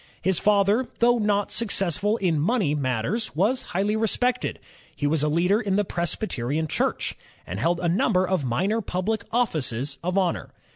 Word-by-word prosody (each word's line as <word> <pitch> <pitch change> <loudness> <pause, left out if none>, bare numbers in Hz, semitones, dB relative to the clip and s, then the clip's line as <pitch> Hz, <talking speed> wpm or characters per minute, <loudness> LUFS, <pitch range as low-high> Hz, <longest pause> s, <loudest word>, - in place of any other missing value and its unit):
His 190 -2 +1
father, 210 +4 +3
though 240 0 +3
not 205 -1 +1
successful 205 -1 0
in 175 -7 +1
money 185 - +1
matters, 145 - -2
was 215 +10 +1
higlily 200 +3 +1
respected; 245 +3 +1 0.4
he 145 - -3
was 150 +1 +2
a 150 - +2
leader 180 +8 +2
in 200 -3 -1
the 205 0 +2
Presbyterian 160 - -1
Church, - - -1 0.3
and 95 +3 -5
held 170 +8 +1
a 175 - -1
num 190 +6 +2
ber 185 0 +3
of 185 -5 0
minor 190 - 0
public 205 +3 -2
offices 140 - -1
of 180 +2 -1
honor. 185 -3 0
185 Hz, 165 wpm, -25 LUFS, 155-215 Hz, 0.4 s, father